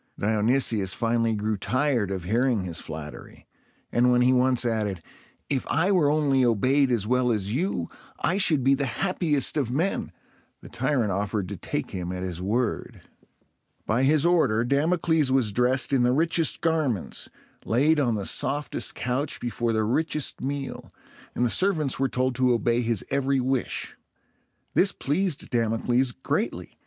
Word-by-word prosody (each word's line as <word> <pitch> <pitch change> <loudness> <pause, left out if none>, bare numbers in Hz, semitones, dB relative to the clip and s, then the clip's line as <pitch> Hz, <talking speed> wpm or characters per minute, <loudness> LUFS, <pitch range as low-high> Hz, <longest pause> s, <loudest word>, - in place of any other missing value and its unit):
Dionysius 110 -2 +1
finally 115 -1 0
grew 105 0 -2
tired 130 -1 0
of 95 -3 -4
hearing 115 +2 +1
his 85 -2 -3
flattery; 75 -1 -9 0.5
and 125 +1 +3
when 125 0 +3
he 125 +1 +4
once 125 -1 +2
added, 105 -7 -2 0.4
"If 135 -3 -1
I 165 +6 +2
were 170 -7 +3
only 145 -3 +2
obeyed 130 +4 +2
as 115 -5 0
well 125 +1 +1
as 105 -2 -1
you, 135 - -1 0.3
I 185 - +1
should 155 -9 +3
be 135 +2 +4
the 140 0 0
happiest 160 -4 0
of 135 -6 0
men," 160 +10 -1 0.5
the - - -13
tyrant 130 -5 0
offered 100 0 -2
to 100 - -5
take 85 - -4
him 90 -1 -4
at 90 0 -5
his 90 -2 -5
word. 110 +4 -2 0.8
By 115 +4 +1
his 150 +3 +3
order, 140 -11 +3
Damocles 155 +1 +1
was 130 -5 +2
dressed 125 +5 +1
in 135 - +3
the 125 +1 +3
richest 165 +2 +1
garments, 155 - -1 0.3
laid 150 +7 +2
on 120 -5 +1
the 100 -2 -3
softest 145 +8 -1
couch 130 +4 -2
before 120 -1 -2
the 110 -1 0
richest 150 +6 -1
meal, 140 +1 -5 0.4
and 125 - +1
the - - +1
servants 160 -10 +1
were 135 0 +1
told 130 +1 0
to 130 -1 +3
obey 120 +1 +1
his 115 -3 -2
every 140 0 +1
wish. 130 0 -2 0.8
This 190 +1 +3
pleased 165 +2 -2
Damocles 120 +2 +1
greatly. - - -4
125 Hz, 160 wpm, -25 LUFS, 110-145 Hz, 0.8 s, he